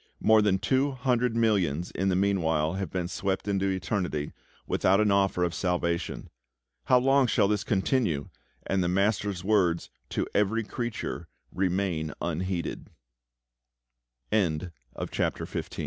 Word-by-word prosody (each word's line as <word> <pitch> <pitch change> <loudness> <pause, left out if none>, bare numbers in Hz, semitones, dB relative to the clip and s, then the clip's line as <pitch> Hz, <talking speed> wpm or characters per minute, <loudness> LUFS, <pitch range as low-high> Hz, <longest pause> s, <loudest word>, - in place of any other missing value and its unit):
More 110 0 +5
than 100 -2 +3
two 130 +7 +1
hundred 125 -2 0
millions 95 -8 +1
in 95 +2 0
the 90 - +2
meanwhile 85 -5 +1
have 95 -2 -3
been 90 0 -2
swept 95 +2 -2
into 100 -1 +1
eternity, 90 -5 -2 0.3
without 95 +2 +2
an 105 -1 +3
offer 95 -2 +2
of 85 -1 0
salvation. 85 -1 -2 0.5
How 125 - +5
long 135 +1 +4
shall 105 -3 +3
this 105 0 0
continue, 95 - 0 0.4
and 95 -1 +1
the - - 0
MASTER'S 100 0 0
words, 95 -5 +1 0.2
"To - - -1
every 105 +3 +2
creature," 120 +1 -4 0.3
remain 90 -4 -1
unheeded? 85 +1 -3 1.4
[Illu 90 -4 +1
95 Hz, 125 wpm, -28 LUFS, 90-105 Hz, 1.4 s, More